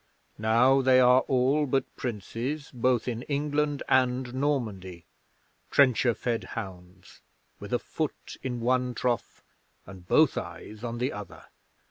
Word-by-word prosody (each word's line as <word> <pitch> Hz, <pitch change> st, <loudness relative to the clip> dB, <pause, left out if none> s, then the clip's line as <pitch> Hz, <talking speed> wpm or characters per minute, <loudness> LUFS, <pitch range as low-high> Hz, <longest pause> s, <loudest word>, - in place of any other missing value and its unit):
Now 120 Hz, +5 st, +4 dB
they 130 Hz, -1 st, +5 dB
are 125 Hz, 0 st, +6 dB
all 135 Hz, +3 st, +2 dB
but 135 Hz, +1 st, -1 dB
princes 125 Hz, +5 st, -4 dB
both 125 Hz, -1 st, +1 dB
in 120 Hz, -1 st, -2 dB
England 145 Hz, +1 st, -1 dB
and 125 Hz, -1 st, +1 dB
Normandy 110 Hz, -, -2 dB, 0.6 s
trencher 130 Hz, -3 st, +4 dB
fed 120 Hz, -2 st, -2 dB
hounds, 90 Hz, -4 st, -9 dB, 0.4 s
with -, -, -9 dB
a -, -, +3 dB
foot -, -, -5 dB
in 125 Hz, -3 st, -4 dB
one 125 Hz, +1 st, +1 dB
trough 120 Hz, -2 st, -2 dB, 0.4 s
and 90 Hz, -2 st, -12 dB
both -, -, +4 dB
eyes 110 Hz, +1 st, -9 dB
on 120 Hz, -1 st, -4 dB
the 125 Hz, +2 st, -1 dB
other! 95 Hz, -6 st, -9 dB
125 Hz, 130 wpm, -27 LUFS, 110-130 Hz, 0.6 s, are